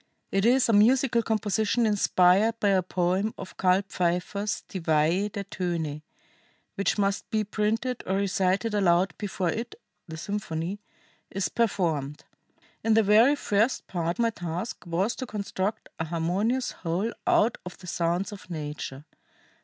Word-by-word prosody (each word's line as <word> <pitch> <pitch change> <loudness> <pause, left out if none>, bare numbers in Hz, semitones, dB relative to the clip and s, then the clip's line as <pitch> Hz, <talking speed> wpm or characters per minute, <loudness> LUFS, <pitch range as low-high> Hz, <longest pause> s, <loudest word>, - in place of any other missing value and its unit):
It 195 +1 +1
is 255 +1 +4
a 230 - +2
musical 235 +3 +4
composition 220 +1 +1
inspired 205 +1 +3
by 205 - +2
a 190 -1 +4
poem 185 +4 0
of - - -9
Karl 185 +1 +3
Pfeiffer's 180 +4 -1
Die 190 - -5
Weihe 165 +5 +2
der 200 - -4
Töne 170 -6 -3 0.7
which 200 - 0
must 200 -1 0
be 215 -2 +1
printed 220 +4 -1
or 190 - +1
recited 195 +1 +1
aloud 180 -3 +3
before 190 -3 -2
it 230 +4 -5 0.3
[the 160 -1 -7
symphony] 185 0 -3 0.5
is 195 -1 -2
performed. 165 -11 -1 0.6
In 225 -1 +3
the 225 - +5
very 220 +8 +5
first 225 -2 +1
part 170 -1 -2
my 230 -1 +2
task 175 +3 -5
was 185 +7 0
to 260 - -5
construct 200 -1 -3
a 160 - -1
harmonious 185 +10 0
whole 185 +7 -2
out 225 +2 +3
of 180 - -9
the 180 - -13
sounds 175 +3 -1
of 200 -2 -11
nature. 150 -3 -6
195 Hz, 145 wpm, -27 LUFS, 175-220 Hz, 0.7 s, the